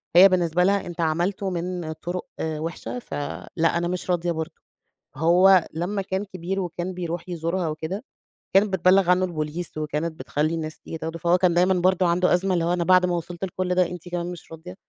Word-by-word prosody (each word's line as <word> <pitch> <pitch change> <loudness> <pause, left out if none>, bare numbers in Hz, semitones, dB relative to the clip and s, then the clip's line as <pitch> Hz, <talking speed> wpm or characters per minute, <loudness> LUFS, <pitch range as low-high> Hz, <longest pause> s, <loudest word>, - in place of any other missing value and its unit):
هي 190 +3 +10
بالنسبة 180 -1 +2
لها 200 +1 +2
"أنتَ 175 -1 -5
عملته 175 +5 0
من 175 -2 -3
طُرُق 175 +3 -5 0.2
وحشة، 160 +9 -4
فلأ 145 - -2
أنا 175 - 0
مش 180 +1 -4
راضِية 175 0 0
برضه." 160 0 -3 0.6
هو 175 +4 +5
لمّا 180 +5 -2
كان 190 +1 -3
كبير 185 0 -4
وكان 175 0 -3
بيرُوح 175 0 -5
يزورها 170 +1 -1
وكده، 160 +7 -4 0.5
كانت 195 0 +4
بتبلِّغ 185 +1 +4
عنه 180 +1 +4
البوليس، 160 -1 -4
وكانت 155 +2 -3
بتخلِّي 155 +3 -1
الناس 155 -1 -5
تيجي 165 - -7
تاخُده، 165 +1 -5
فهو 170 +2 +3
كان 180 -2 +3
دايمًا 180 +2 +4
برضه 185 0 +2
عنده 180 +2 +3
أزمة 190 +2 +2
اللي 170 -2 +1
هو 175 - +1
"أنا 175 -1 0
بعد 185 +1 +5
ما 175 - 0
وصلت 175 +1 -6
لكل 180 0 -2
ده، 180 0 +4
أنتِ 175 0 -8
كمان 175 0 -3
مش 175 -2 -11
راضِية؟" 165 +3 -9
175 Hz, 195 wpm, -24 LUFS, 165-185 Hz, 0.6 s, هي